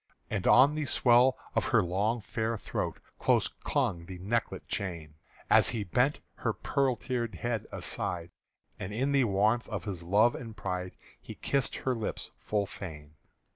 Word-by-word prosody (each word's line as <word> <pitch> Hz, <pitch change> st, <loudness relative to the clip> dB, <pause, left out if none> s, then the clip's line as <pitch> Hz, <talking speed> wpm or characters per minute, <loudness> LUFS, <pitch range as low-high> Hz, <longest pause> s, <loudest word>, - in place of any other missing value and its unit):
And -, -, -1 dB
on 140 Hz, +3 st, +7 dB
the 155 Hz, -1 st, -2 dB
swell 125 Hz, 0 st, +5 dB, 0.2 s
of -, -, +1 dB
her 115 Hz, -4 st, +4 dB
long 105 Hz, +7 st, 0 dB
fair 110 Hz, +2 st, -2 dB
throat -, -, -3 dB, 0.2 s
Close -, -, +3 dB
clung 85 Hz, -1 st, -2 dB
the 95 Hz, -, -7 dB
necklet 110 Hz, +6 st, -2 dB
chain 85 Hz, -6 st, -3 dB, 0.3 s
As -, -, +6 dB
he 110 Hz, -3 st, -2 dB
bent 125 Hz, +10 st, +1 dB, 0.2 s
her -, -, 0 dB
pearl 135 Hz, -3 st, +1 dB
tir'd 120 Hz, -3 st, -3 dB
head 120 Hz, -3 st, -2 dB
aside, 85 Hz, -1 st, -4 dB, 0.5 s
And 95 Hz, -, -5 dB
in 135 Hz, +6 st, 0 dB
the 135 Hz, -2 st, +4 dB
warmth 110 Hz, +4 st, +2 dB
of -, -, -3 dB
his 95 Hz, -5 st, -4 dB
love 105 Hz, +7 st, +4 dB
and 115 Hz, -3 st, -8 dB
pride 90 Hz, -1 st, -3 dB, 0.3 s
He -, -, -9 dB
kissed 135 Hz, -4 st, 0 dB
her 130 Hz, -, -1 dB
lips 115 Hz, -3 st, -4 dB
full 105 Hz, -1 st, -1 dB
fain. 75 Hz, -7 st, -9 dB
110 Hz, 165 wpm, -30 LUFS, 95-120 Hz, 0.5 s, on